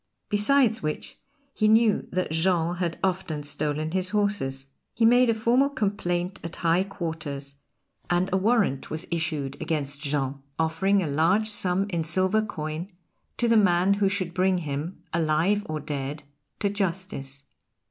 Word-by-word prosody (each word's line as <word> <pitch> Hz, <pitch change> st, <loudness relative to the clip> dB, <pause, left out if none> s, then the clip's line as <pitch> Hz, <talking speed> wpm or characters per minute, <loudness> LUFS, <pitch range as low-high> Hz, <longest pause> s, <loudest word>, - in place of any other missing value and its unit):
Besides 225 Hz, +2 st, +3 dB
which 155 Hz, 0 st, -4 dB, 0.3 s
he 215 Hz, -, +2 dB
knew 220 Hz, -1 st, +4 dB
that 185 Hz, -3 st, -1 dB
Jean 170 Hz, +1 st, +1 dB
had 175 Hz, -2 st, -2 dB
often 180 Hz, -5 st, -1 dB
stolen 150 Hz, +2 st, -2 dB
his 185 Hz, 0 st, 0 dB
horses. 200 Hz, -11 st, -1 dB, 0.3 s
He 230 Hz, -, +3 dB
made 245 Hz, +1 st, +5 dB
a -, -, +4 dB
formal 240 Hz, +5 st, +3 dB
complaint 195 Hz, -7 st, -2 dB
at 170 Hz, -, -5 dB
high 170 Hz, +2 st, +2 dB
quarters, 155 Hz, -7 st, -5 dB, 0.6 s
and 175 Hz, +1 st, +2 dB
a -, -, +4 dB
warrant 200 Hz, -, +1 dB
was 155 Hz, +3 st, -3 dB
issued 155 Hz, -5 st, -2 dB
against 145 Hz, -3 st, -2 dB
Jean, 140 Hz, -2 st, -1 dB, 0.2 s
offering 175 Hz, +5 st, +2 dB
a -, -, -2 dB
large 175 Hz, +9 st, +2 dB
sum 190 Hz, -1 st, +1 dB
in 170 Hz, -2 st, 0 dB
silver 185 Hz, +6 st, +2 dB
coin 160 Hz, -3 st, -5 dB, 0.5 s
to 240 Hz, -, +1 dB
the 230 Hz, -, +4 dB
man 185 Hz, -1 st, +4 dB
who 200 Hz, -1 st, +2 dB
should 185 Hz, -3 st, -1 dB
bring 185 Hz, +1 st, +2 dB
him, 155 Hz, +2 st, -4 dB
alive 170 Hz, +5 st, +2 dB
or 155 Hz, 0 st, -2 dB
dead, 145 Hz, 0 st, -4 dB, 0.4 s
to 200 Hz, -, +2 dB
justice. 175 Hz, -8 st, -3 dB
175 Hz, 150 wpm, -26 LUFS, 155-200 Hz, 0.6 s, made